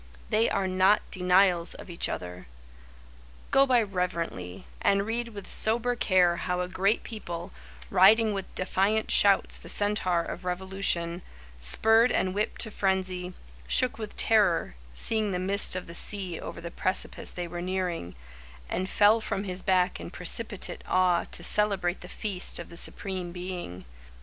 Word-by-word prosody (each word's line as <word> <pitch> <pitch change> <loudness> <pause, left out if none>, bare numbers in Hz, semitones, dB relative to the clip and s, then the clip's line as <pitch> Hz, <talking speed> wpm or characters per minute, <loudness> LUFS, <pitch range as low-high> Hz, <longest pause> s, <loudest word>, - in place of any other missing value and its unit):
They 220 +2 +3
are 195 -2 0
not 185 +3 +3
denials 180 -2 +2
of - - -11
each 170 -2 -1
other. 90 -4 -6 1.0
Go 275 0 +5
by 245 -3 +4
reverently, 170 - -4 0.2
and 200 0 +2
read 235 +2 -2
with 205 -3 -10
sober 235 +3 +1
care 180 -6 +3
How 180 0 -2
a 180 - -2
great 195 +4 0
people, 175 -7 -7 0.4
riding 215 +3 +5
with 195 -1 -6
defiant 195 +4 0
shouts 200 -1 +4
The - - -13
centaur 205 -4 +1
of 180 - -7
Revolution, 180 -1 -2 0.4
Spurred 225 - +4
and 185 0 0
whipped 210 +2 -2
to 220 - -1
frenzy, 185 -2 -1 0.3
Shook - - 0
with - - -7
terror, 65 -2 +2 0.2
seeing 215 - +1
the - - -1
mist 195 +2 +2
of 185 - -4
the 170 - -10
sea 185 -1 +1
Over - - -7
the 170 0 -7
precipice 185 +2 -1
they 175 -1 -5
were 175 0 -6
nearing, 180 - -3 0.5
And 185 +1 -2
fell 215 +2 +4
from 195 -2 -3
his 185 -2 0
back 185 0 +1
in - - -7
precipitate - - -3
awe 180 -2 +2
To 175 - -5
celebrate 195 -3 +3
the 180 - -10
Feast 195 -4 -2
of - - -8
the 170 - -11
Supreme 185 0 -2
Being. 175 - -7
185 Hz, 155 wpm, -27 LUFS, 175-205 Hz, 1.0 s, Go